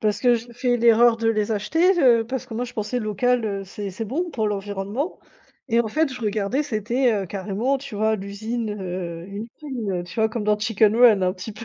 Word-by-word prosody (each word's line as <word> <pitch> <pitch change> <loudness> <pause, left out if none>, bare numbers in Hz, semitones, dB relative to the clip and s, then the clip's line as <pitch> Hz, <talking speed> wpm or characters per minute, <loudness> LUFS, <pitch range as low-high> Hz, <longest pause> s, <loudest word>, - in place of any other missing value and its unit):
parce 210 -1 +1
que 245 -1 +4
j'ai 235 +1 -5
fais 245 0 0
l'erreur 235 0 +5
de 225 0 +1
les 215 0 +1
acheter, 325 - +2
heu, 235 -3 +5
parce 260 +1 -4
que 230 - -8
moi 245 +3 -1
je 245 - -9
pensais 235 +1 -2
local, 240 +2 +1
heu, 200 -2 -3
c'est 200 +1 -6
c'est 225 - -4
bon 315 - -2
pour 220 -5 0
l'environnement 205 - -3 0.5
et 230 -1 +2
en 235 - -1
fait 310 +6 0
je 250 - -8
regardais, 215 +6 0
c'était, 240 +1 +1
heu, 200 -3 -1
carrément 205 +8 -1
tu 265 -4 -9
vois 220 +1 +1
l'usine, 215 +3 -4
heu, 180 -4 -5
une 205 +3 -6 0.2
usine 225 -11 -3
tu 175 - -11
vois 220 -1 +3
comme 225 -1 -4
dans 210 0 +2
Chicken 215 0 +2
Run 230 -5 +6
un 185 0 +2
petit 185 +3 -8
peu, 215 +3 -9
220 Hz, 225 wpm, -23 LUFS, 205-245 Hz, 0.5 s, Run